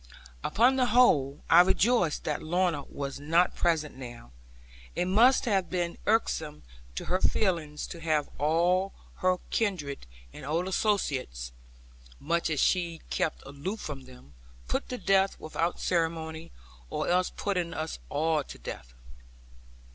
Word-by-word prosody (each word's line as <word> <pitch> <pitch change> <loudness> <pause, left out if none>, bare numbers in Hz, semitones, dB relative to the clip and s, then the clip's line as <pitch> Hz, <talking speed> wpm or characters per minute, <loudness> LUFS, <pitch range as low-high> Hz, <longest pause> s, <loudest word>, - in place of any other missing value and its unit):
Upon 250 +5 +3
the 255 -1 +3
whole, 155 - +4
I 170 +2 +8
rejoiced 190 -2 +2
that 150 - -2
Lorna 170 -3 0
was 140 -1 -5
not 165 +5 +2
present 160 -3 0
now. 120 - -10 0.6
It 175 - +1
must 230 +8 +5
have 195 -6 +1
been 175 -2 -2
irksome 160 -8 0 0.3
to - - -4
her 185 +1 0
feelings 165 -7 0
to 170 - -8
have 155 -3 0
all 175 +6 +2 0.2
her 185 0 +2
kindred 160 - -1 0.3
and - - -10
old 165 +6 -1
associates 140 - -1 0.7
(much 170 +4 0
as 155 -3 -1
she 170 -3 +1
kept 155 - -1
aloof 145 +11 -5
from 135 -7 -6
them) 125 - -16 0.3
put - - -2
to 250 - -3
death 195 -3 +2
without 165 +2 -2
ceremony, 165 -1 -1 0.4
or - - -2
else 180 +1 +2
putting 180 -4 -1
all 160 - -3
of 160 - -6
us 155 0 0
to - - -9
death. - - -8
165 Hz, 140 wpm, -29 LUFS, 150-185 Hz, 0.7 s, I